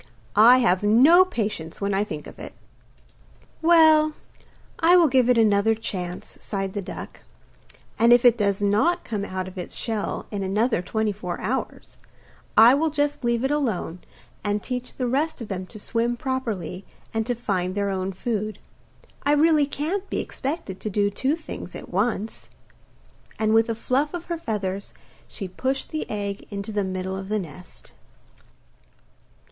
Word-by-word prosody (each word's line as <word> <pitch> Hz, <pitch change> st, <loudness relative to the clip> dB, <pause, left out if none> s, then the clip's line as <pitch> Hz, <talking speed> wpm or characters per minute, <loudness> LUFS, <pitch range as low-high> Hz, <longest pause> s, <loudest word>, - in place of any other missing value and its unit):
I 230 Hz, +5 st, +8 dB
have 190 Hz, -8 st, +3 dB
no 260 Hz, -, +7 dB
patience 210 Hz, -, -4 dB
when 200 Hz, 0 st, -1 dB
I 195 Hz, +1 st, +2 dB
think 155 Hz, -8 st, -6 dB
of -, -, -12 dB
it.' -, -, -9 dB, 1.1 s
'Well, 315 Hz, -2 st, +6 dB, 0.7 s
I 340 Hz, +2 st, +6 dB
will 340 Hz, -2 st, +6 dB
give 255 Hz, -2 st, +3 dB
it 250 Hz, -, +4 dB
another 220 Hz, 0 st, +4 dB
chance,' 180 Hz, -5 st, -6 dB
sighed 195 Hz, -2 st, -3 dB
the 205 Hz, -, -3 dB
duck, 180 Hz, -, -8 dB, 0.8 s
'and 230 Hz, +1 st, +5 dB
if 240 Hz, 0 st, +6 dB
it 240 Hz, -2 st, +7 dB
does 200 Hz, -2 st, 0 dB
not 220 Hz, -, +2 dB
come 210 Hz, -3 st, -3 dB
out 185 Hz, -1 st, -4 dB
of 185 Hz, 0 st, -8 dB
its 180 Hz, -, -7 dB
shell 220 Hz, -3 st, -3 dB
in 205 Hz, -2 st, -3 dB
another 205 Hz, +2 st, +1 dB
twenty 215 Hz, +4 st, -1 dB
four 180 Hz, -3 st, -5 dB
hours, 265 Hz, +3 st, -4 dB, 0.6 s
I 230 Hz, +3 st, +9 dB
will 315 Hz, +3 st, +2 dB
just 290 Hz, -1 st, -1 dB
leave 235 Hz, 0 st, +1 dB
it 265 Hz, -, +1 dB
alone 225 Hz, -, -1 dB, 0.4 s
and 205 Hz, 0 st, -1 dB
teach 250 Hz, -1 st, -5 dB
the 255 Hz, -, -2 dB
rest 290 Hz, +6 st, 0 dB
of 230 Hz, -, -7 dB
them 185 Hz, -2 st, -4 dB
to 215 Hz, -, -11 dB
swim 235 Hz, +3 st, -1 dB
properly 220 Hz, -, -3 dB, 0.3 s
and 225 Hz, 0 st, 0 dB
to 245 Hz, -, 0 dB
find 190 Hz, -6 st, -2 dB
their 200 Hz, -1 st, 0 dB
own 190 Hz, 0 st, -2 dB
food. 215 Hz, +2 st, -3 dB, 0.6 s
I 290 Hz, -, +2 dB
really 300 Hz, -1 st, +4 dB
can't 355 Hz, +8 st, -3 dB
be -, -, -2 dB
expected 265 Hz, -, -4 dB
to 215 Hz, -, -4 dB
do 205 Hz, 0 st, +1 dB
two 265 Hz, +8 st, 0 dB
things 315 Hz, -, -8 dB
at -, -, -8 dB
once.' 210 Hz, +3 st, -2 dB, 0.9 s
And 220 Hz, 0 st, +1 dB
with 225 Hz, +1 st, +4 dB
a 230 Hz, -, 0 dB
fluff 275 Hz, +8 st, 0 dB
of 345 Hz, -, -6 dB
her -, -, -2 dB
feathers 200 Hz, -, -3 dB, 0.3 s
she 195 Hz, -, -6 dB
pushed 260 Hz, +9 st, -3 dB
the 310 Hz, -, -4 dB
egg 200 Hz, -1 st, -4 dB
into 200 Hz, +1 st, -5 dB
the 205 Hz, -1 st, 0 dB
middle 185 Hz, 0 st, -3 dB
of 190 Hz, 0 st, -6 dB
the 215 Hz, -, +1 dB
nest. 180 Hz, -1 st, -9 dB
220 Hz, 170 wpm, -24 LUFS, 195-265 Hz, 1.1 s, I